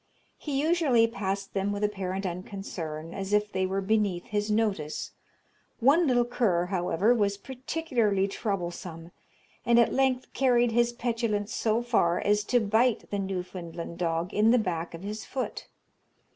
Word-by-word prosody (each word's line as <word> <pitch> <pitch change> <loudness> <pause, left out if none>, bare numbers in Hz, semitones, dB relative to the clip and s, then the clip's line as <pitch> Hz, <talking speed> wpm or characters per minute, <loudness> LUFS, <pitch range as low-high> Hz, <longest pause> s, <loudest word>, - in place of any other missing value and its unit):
He 280 -3 -2
usually 300 -7 +3
passed 195 -3 -3
them 195 +1 0
with 205 +1 -3
apparent 195 -2 -2
unconcern, 170 -3 -5
as 195 +1 -4
if 210 0 +2
they 190 0 0
were 195 +1 -1
beneath 200 -3 +1
his 210 -2 -2
notice. 210 -8 -1 0.7
One 295 +7 +4
little 245 -2 +3
cur, 205 -8 +1
however, 185 +4 +2
was 200 -4 +1
particularly 245 -6 -1
troublesome, 175 -5 -4 0.5
and 235 0 +4
at 235 - +4
length 260 -1 +1
carried 245 -3 +3
his 240 +1 +3
petulance 230 -3 -2
so 225 0 +1
far 180 -8 +2
as 210 0 +2
to 245 - +3
bite 220 +2 +1
the 205 - -1
Newfoundland 180 -3 -5
dog 165 0 -1
in 215 +2 +4
the 245 - +6
back 170 -6 -2
of 165 - -10
his 210 +2 -5
foot. 260 -1 -4
205 Hz, 150 wpm, -28 LUFS, 185-240 Hz, 0.7 s, the